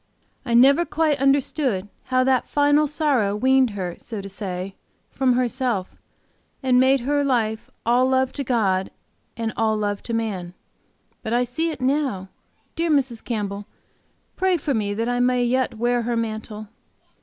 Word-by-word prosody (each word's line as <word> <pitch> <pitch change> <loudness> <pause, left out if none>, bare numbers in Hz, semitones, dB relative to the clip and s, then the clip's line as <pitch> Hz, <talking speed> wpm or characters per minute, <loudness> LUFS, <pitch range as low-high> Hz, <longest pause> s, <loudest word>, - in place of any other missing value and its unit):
"I 235 - +1
never 275 +7 +6
quite 305 -3 0
understood 270 -6 +1 0.2
how 255 0 +2
that 260 -1 +2
final 290 +1 +3
sorrow 275 -9 +1
weaned 260 +3 +3
her, 180 -3 -4
so 220 -3 -6
to 195 - -7
say, 190 -1 -5 0.4
from 260 -1 +2
herself, 245 -5 -1 0.7
and 255 -1 +4
made 265 0 +4
her 285 +3 +1
life 225 -5 -1 0.2
all 245 +2 +3
love 260 0 +2
to 280 - -3
God 200 -7 +1 0.5
and 225 -1 -2
all 220 -1 +1
love 205 -1 -2
to - - -1
man. 190 -6 -3 0.7
But 220 - -3
I 245 +1 +3
see 270 +8 -2
it 295 -5 -6
now. 255 -8 0 0.5
Dear 335 0 -1
Mrs. 265 -6 +1
Campbell, 205 -3 -4 0.7
pray 375 -1 +2
for 290 -2 -2
me 205 -3 -1
that 230 +2 -1
I 245 0 0
may 250 0 +2
yet 245 -1 0
wear 240 +1 +1
her 235 0 -1
mantle!" 215 -1 -5
245 Hz, 160 wpm, -23 LUFS, 215-270 Hz, 0.7 s, never